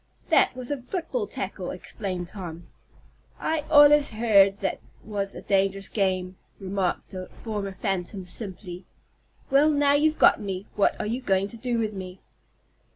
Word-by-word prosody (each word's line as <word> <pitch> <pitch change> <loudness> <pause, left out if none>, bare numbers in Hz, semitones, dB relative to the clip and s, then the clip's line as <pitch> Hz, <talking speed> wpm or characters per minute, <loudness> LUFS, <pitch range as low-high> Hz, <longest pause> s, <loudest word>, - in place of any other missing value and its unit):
"That - - +4
was 255 +1 -6
a 285 -3 -2
football 375 - -3
tackle," - - -5
explained 185 -5 -5
Tom. 175 -4 -8 0.7
"I 315 -2 -1
allers 295 -1 +7
heard 205 -3 +4
that 195 - -2 0.2
was 200 -2 -3
a - - -8
dangerous 195 0 +1
game!" 185 -2 -1 0.2
remarked 190 -1 -2
the 185 -1 -7
former 205 -3 -3
phantom 190 -1 -3
simply. 180 -2 -5 0.6
"Well, 285 +3 +5
now 285 -1 +3
you've 305 +2 +2
got - - +5
me, 195 -1 -4
what 205 - +2
are - - -2
you 235 +5 -2
going 195 -4 +1
to 235 - -10
do 240 0 -2
with 220 -2 -1
me?" 185 -1 -8
200 Hz, 155 wpm, -26 LUFS, 190-250 Hz, 0.7 s, allers